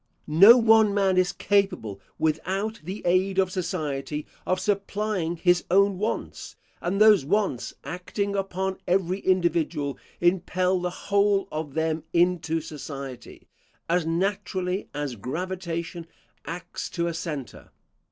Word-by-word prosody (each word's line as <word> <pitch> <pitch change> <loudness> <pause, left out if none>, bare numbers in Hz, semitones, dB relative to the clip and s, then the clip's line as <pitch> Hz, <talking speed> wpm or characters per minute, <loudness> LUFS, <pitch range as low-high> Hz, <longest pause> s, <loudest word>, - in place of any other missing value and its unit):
No 195 +10 +8
one 220 -3 +5
man 195 -2 +3
is 180 -1 +3
capable, 185 - 0 0.2
without 190 +7 -1
the 190 +6 -6
aid 185 +2 +2
of 190 -1 +2
society, 155 -5 -3 0.2
of 185 - +1
supplying 200 -3 -1
his 175 +1 +2
own 195 +1 +3
wants, 215 +3 -4 0.3
and 185 +3 -1
those 215 -6 +7
wants, 170 - -1
acting 200 +3 -3
upon 190 -1 -2
every 185 +1 +1
individual, 170 -6 0 0.2
impel 180 +1 +1
the 180 0 -1
whole 200 +2 +1
of 155 -3 -5
them 160 0 0
into 170 -2 +2
society, 140 -4 -8 0.4
as 175 +1 +2
naturally 185 +2 -2
as 145 -3 -3
gravitation 170 - -4 0.4
acts 170 +2 -6
to 170 -1 -2
a 170 - -1
centre. 155 -6 -6
180 Hz, 125 wpm, -25 LUFS, 160-195 Hz, 0.4 s, No